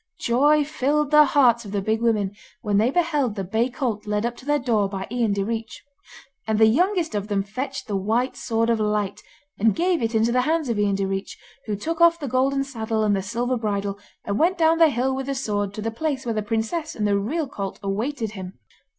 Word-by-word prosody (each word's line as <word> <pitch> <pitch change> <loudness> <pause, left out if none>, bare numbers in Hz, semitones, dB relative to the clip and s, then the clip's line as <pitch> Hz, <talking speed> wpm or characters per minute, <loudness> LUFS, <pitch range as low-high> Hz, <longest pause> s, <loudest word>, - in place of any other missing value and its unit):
Joy 290 +5 +3
filed 300 0 0
the 300 0 +8
hearts 250 -4 +4
of 200 - -9
the 205 - 0
Big 220 +3 -1
Women 210 -4 +1 0.3
when 205 -2 +1
they 225 +3 +3
beheld 295 -7 0
the 195 - -3
bay 220 +7 0
colt 235 -5 -3
led 210 +1 0
up 240 0 -2
to 255 - -14
their 295 0 +3
door 225 -7 +1
by 195 -1 -4
Ian 240 -3 +1
Direach. 220 +3 -3 0.7
And 220 -1 +1
the 220 - +6
youngest 345 - +2
of 205 -1 -2
them 200 -2 0
fetched 260 +7 -5
the 205 - -3
White 225 +7 0
Sword 230 0 0
of 230 - +1
Light, 210 -2 -1 0.4
and 220 +1 +3
gave 350 0 +1
it 225 0 -1
into 225 +2 +3
the 250 +1 +3
hands 310 0 0
of 225 -3 0
Ian 205 -1 +2
Direach, 195 0 -3 0.3
who 210 - -1
took 325 - -4
off 340 0 +6
the 285 - -4
golden 270 +2 +1
saddle 225 -5 -2
and 205 -1 +2
the 195 - -1
silver 240 +6 -1
bridle, 200 -2 -2 0.3
and 200 0 -1
went 355 +3 +3
down 325 0 +3
the 325 -1 +7
hill 260 0 0
with 265 0 -4
the 275 - -2
sword 205 -6 -2
to 215 - -5
the 225 - -2
place 270 +2 -3
where 230 - -1
the 215 - -1
princess 225 +10 -2
and 210 - -1
the 200 -1 +2
real 290 +10 -2
colt 200 -7 -5
awaited 220 +4 -2
him. 190 -3 -8
230 Hz, 230 wpm, -23 LUFS, 210-275 Hz, 0.7 s, the